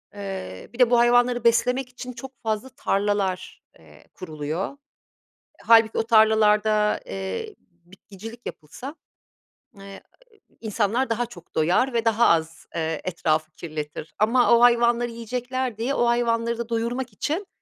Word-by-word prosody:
ııı, 190 - -7
bir 240 - -13
de 250 -2 +6
bu 240 - +5
hayvanları 245 0 +3
beslemek 250 +2 +2
için 250 0 -8
çok 265 +2 -9
fazla 220 +3 -2
tarlalar, 200 -4 -2 0.2
eee, 75 -2 -19
kuruluyor. 160 - -5 0.8
Hâlbuki 225 -1 +5
o - - +2
tarlalarda, 215 -1 +3
eee, 390 - -5
bitkicilik 195 +6 -13
yapılsa; 250 - -8 0.8
eee, 195 0 -11 0.6
insanlar 225 +3 0
daha 235 +1 0
çok 195 -8 -15
doyar 180 +12 +2
ve 230 -1 0
daha 225 +1 +4
az, 165 0 0
ııı, 160 -1 -2
etrafı 155 -3 -1
kirletir 155 -1 -7
ama 235 +2 +4
o - - +2
hayvanları 240 0 +4
yiyecekler 245 +1 -4
diye 240 +5 -1
o 240 - +1
hayvanları 235 -1 +1
da 235 0 -5
doyurmak 235 +2 -2
için 345 +7 -3
225 Hz, 135 wpm, -24 LUFS, 190-240 Hz, 0.8 s, de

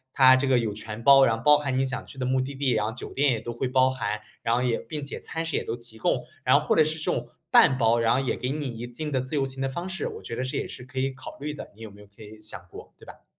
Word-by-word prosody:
他 130 -1 +8
这 135 +1 +1
个 130 -2 +4
有 110 -3 -2
全 110 +1 -7
包， 135 -1 +8
然 115 - +2
后 115 - -8
包 150 0 +7
含 135 -3 -1
你 135 - +1
想 130 - -4
去 135 - -12
的 130 - -1
目 130 0 +2
的 130 +2 -3
地， 135 0 -1
然 110 -3 +1
后 110 - -2
酒 125 - -8
店 140 0 +3
也 115 - 0
都 120 - -5
会 120 +2 -2
包 130 0 +3
含。 110 -5 -3 0.2
然 115 - +1
后 125 - +1
也 125 -2 +1
并 155 -2 -6
且 140 - -6
餐 165 0 -4
食 165 - -3
也 - - -2
都 115 - -3
提 120 -2 -15
供， - - 0 0.2
然 - - +5
后 - - -7
或 - - +3
者 155 - +6
是 155 +1 -3
这 - - -5
种 120 0 -3 0.2
半 130 -1 +6
包， 115 0 +4
然 115 0 +3
后 125 - +2
也 135 -2 -1
给 125 - -2
你 145 -2 -3
一 120 - -5
定 150 +5 -6
的 130 - +1
自 130 +4 -6
由 140 -2 +2
行 135 0 -5
的 135 - 0
方 170 +7 -5
式， 190 - -3
我 - - -8
觉 115 - -6
得 125 - -2
这 130 - -4
也 - - -2
是 125 - -9
可 130 +1 -6
以 135 +1 +1
考 130 - -10
虑 150 +2 -4
的， 150 - -9
你 110 - -17
有 110 - -7
没 100 0 -16
有 105 - -14
可 100 +2 -20
以 110 0 -12
想 100 -4 -8
过， - - -12
对 - - -15
吧？ - - -13
130 Hz, 365 characters per minute, -26 LUFS, 115-135 Hz, 0.2 s, 他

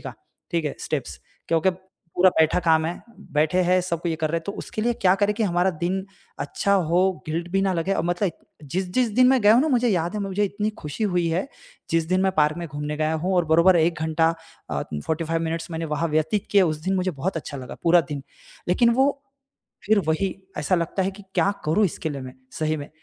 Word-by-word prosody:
का, - - -8 0.4
ठीक 170 -2 0
है 145 - -4
स्टेप्स 95 - -4 0.3
क्योंकि 165 +3 +3 0.5
पूरा 185 0 +7
बैठा 160 +1 +4
काम 160 -2 +3
है, 170 - -5 0.3
बैठे 155 +4 +2
हैं 180 +1 +3
सब 170 -2 -3
को 175 - -1
ये 165 - 0
कर 155 -1 0
रहे 165 - 0
हैं। 165 - -14
तो 200 - -2
उसके 215 - -5
लिए 240 +1 +2
क्या 185 -4 +3
करें 205 +1 +2
कि 220 - -1
हमारा 180 0 +2
दिन 190 +2 0 0.4
अच्छा 200 +7 -1 0.2
हो 175 +2 +3 0.3
गिल्ट 165 +3 -3
भी 195 +2 +1
ना 195 - +1
लगे 175 +4 0
और - - 0
मतलब 175 +1 0 0.3
जिस-जिस 185 - -1
दिन 255 0 +6
मैं 260 -1 +4
गया 210 - +7
हूँ 245 - +5
ना 315 - +1
मुझे 245 -3 +2
याद 175 -2 0
है 210 - -2
मुझे 200 +1 0
इतनी 205 +2 -2
खुशी 150 +8 -3
हुई 175 -1 +1
है। 170 +8 -1 0.4
जिस 165 -1 +2
दिन 185 +1 +2
मैं 190 0 +2
पार्क 150 +1 +3
में 170 - -4
घूमने 150 +1 -4
गया 155 +1 +1
हूँ 190 - +1
और 175 - +3
बराबर 170 +4 +5
1 165 -1 +1
घंटा 160 +1 +2 0.4
45 160 - -2
मिनट्स 165 +1 -3
मैंने 165 0 -3
वहाँ 165 +2 -1
व्यतीत 160 +6 0
किए 200 -2 +6
उस 155 -3 0
दिन 190 - +1
मुझे 185 0 0
बहुत 165 +6 -3
अच्छा 145 -2 -5
लगा 130 -1 -8
पूरा 170 +1 +5
दिन। 145 -2 -4 0.5
लेक़िन 235 -1 +4
वो 265 +3 +4 0.8
फ़िर 210 0 +4
वही 180 +4 0 0.2
ऐसा 150 +5 +1
लगता 170 +3 -1
है 195 - -1
कि 200 +1 -13
क्या 200 - +3
करूँ 195 +8 +3
इसके 160 -2 -3
लिए 140 -2 -5
मैं 130 -1 -8 0.3
सही 155 0 0
में। 145 -1 -8
170 Hz, 230 wpm, -24 LUFS, 160-195 Hz, 0.8 s, पूरा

